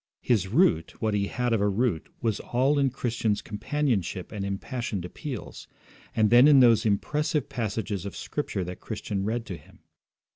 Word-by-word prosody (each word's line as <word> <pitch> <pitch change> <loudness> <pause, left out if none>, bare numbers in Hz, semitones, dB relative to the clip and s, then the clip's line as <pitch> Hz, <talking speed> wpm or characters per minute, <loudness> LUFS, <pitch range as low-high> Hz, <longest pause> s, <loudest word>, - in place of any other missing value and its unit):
His 105 -7 +2
root, 95 - +2
what 110 -1 0
he 100 -1 +1
had 125 +1 -1
of 110 - +1
a 105 - +3
root, 100 -5 0
was 110 -3 0
all 135 +4 +1
in 135 -1 +3
Christian's 115 -4 -1
companionship 105 - -2
and 105 -2 -4
impassioned 100 0 -3
appeals, 130 - -7 0.5
and 110 -1 +3
then 120 +4 +8
in 145 -2 +7
those 115 -3 +5
impressive 150 +7 0
passages 105 -4 -3
of 100 - -6
Scripture 110 -10 -3
that 90 +1 -7
Christian 105 -3 -4
read 115 +2 -2
to 90 -5 -6
him. 75 - -20
110 Hz, 170 wpm, -27 LUFS, 100-125 Hz, 0.5 s, then